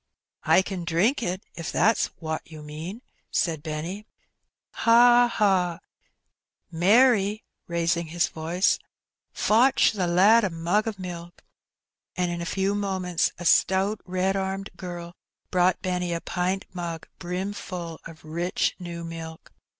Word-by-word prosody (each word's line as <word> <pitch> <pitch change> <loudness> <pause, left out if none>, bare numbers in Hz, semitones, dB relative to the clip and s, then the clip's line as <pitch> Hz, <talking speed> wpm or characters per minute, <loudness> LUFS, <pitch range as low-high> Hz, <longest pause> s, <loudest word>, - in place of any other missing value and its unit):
'' - - -50
I 190 - +5
ken 185 -2 -5
drink 180 - +1
it, 185 -2 -3
if 165 - -5
that's 225 +1 +2
wot 160 -1 -3
you 155 -2 -11
mean," 160 +10 -7 0.3
said 160 -4 0
Benny. 165 +7 -5 0.3
" - - -56 0.2
Ha! 240 +1 +6
ha! 185 -6 +2 0.9
Mary," 210 +3 +4 0.2
raising 170 0 0
his 170 +2 +1
voice, 170 +4 +1
^^ - - -31 0.5
fotch 245 +5 +4
the 190 -5 -1
lad 200 +7 +5
a 200 - +1
mug 175 +6 0
o' 225 - -1
milk." 175 -2 -8 0.7
And 180 -2 0
in 170 0 -4
a 170 - -4
few 195 +3 0
moments 190 -4 0
a 175 - -8
stout 190 +4 +3
red 185 +1 0
armed 195 0 -3
girl 175 -1 -7 0.4
brought 180 0 +2
Benny 180 -2 -1
a 170 - -1
pint 185 +2 -2
mug, 170 -3 -5
brimful 180 -2 -5
of 160 -1 -14
rich 170 +3 -1
new 170 -1 -6
milk. 165 -1 -8
180 Hz, 140 wpm, -25 LUFS, 170-195 Hz, 0.9 s, Ha